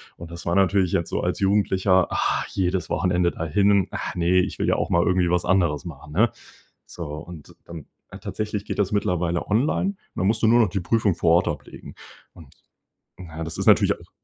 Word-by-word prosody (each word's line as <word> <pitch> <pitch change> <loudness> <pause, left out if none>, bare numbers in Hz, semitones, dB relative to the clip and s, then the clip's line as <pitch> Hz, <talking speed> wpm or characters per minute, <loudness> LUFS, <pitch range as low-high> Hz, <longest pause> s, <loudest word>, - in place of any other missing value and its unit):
Und 85 0 -11
das 85 0 -9
war 85 - 0
natürlich 95 -2 +2
jetzt 85 - 0
so - - -2
als - - -2
Jugendlicher, 95 -2 +2
ah, - - 0
jedes 95 -1 -1
Wochenende 90 -1 +1
dahin. 100 +4 +1
Ach - - -5
ne, 90 +1 +2
ich 95 +2 -2
will - - 0
ja - - +3
auch - - -2
mal 85 - +3
irgendwie 90 -1 +2
was 90 0 +1
anderes 90 -5 +1
machen, 75 -3 -10
ne? 110 +6 +3 0.6
So, 85 - -7
und 80 -1 -11
dann 80 -4 -9 0.4
tatsächlich 105 -1 -4
geht - - -5
das 100 0 0
mittlerweile 90 -4 -1
online. 135 - +1
Und 200 - -7 0.2
dann 90 - -1
musst 110 +2 0
du 110 - +3
nur 120 +2 +5
noch 110 - +2
die 95 - -2
Prüfung 100 0 +1
vor 80 - +2
Ort 85 - +2
ablegen. - - -8 0.4
Und, 80 -4 -14 0.7
na, 80 -3 -8
das 80 0 -6
ist - - -2
natürlich - - +5
auch - - -18
90 Hz, 205 wpm, -23 LUFS, 85-100 Hz, 0.7 s, nur